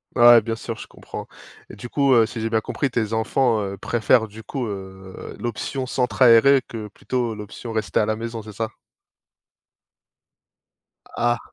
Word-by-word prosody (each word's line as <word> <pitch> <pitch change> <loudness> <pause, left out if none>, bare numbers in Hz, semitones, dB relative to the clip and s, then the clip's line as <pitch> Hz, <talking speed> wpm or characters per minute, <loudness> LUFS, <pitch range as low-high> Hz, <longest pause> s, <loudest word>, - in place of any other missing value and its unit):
Ah 120 -1 +8
ouais, 115 - +7
bien 115 +1 -3
sûr, 115 0 -6
je - - -9
comprends - - -9 0.4
et - - -10
du 120 +4 -8
coup, 140 +1 +2
heu, 115 -2 +6
si 115 0 -6
j'ai 115 - -1
bien 110 -1 +1
compris 140 - -2
tes 115 -3 -1
enfants, 110 0 +1
heu, 100 0 -4
préfèrent 110 +2 +2
du 110 +1 -11
coup, 130 +2 -4
heu, 95 -2 -8
l'option 125 +3 -3
centre 125 0 0
aéré 125 +3 +6
que 110 -2 -6
plutôt 120 +1 -3
l'option 105 +3 -8
rester 110 -1 -1
à 105 - +1
la 110 - 0
maison, 115 0 -5
c'est 110 0 -10
ça? 110 +1 -3 2.5
Ah 120 0 +2
115 Hz, 175 wpm, -22 LUFS, 110-120 Hz, 2.5 s, Ah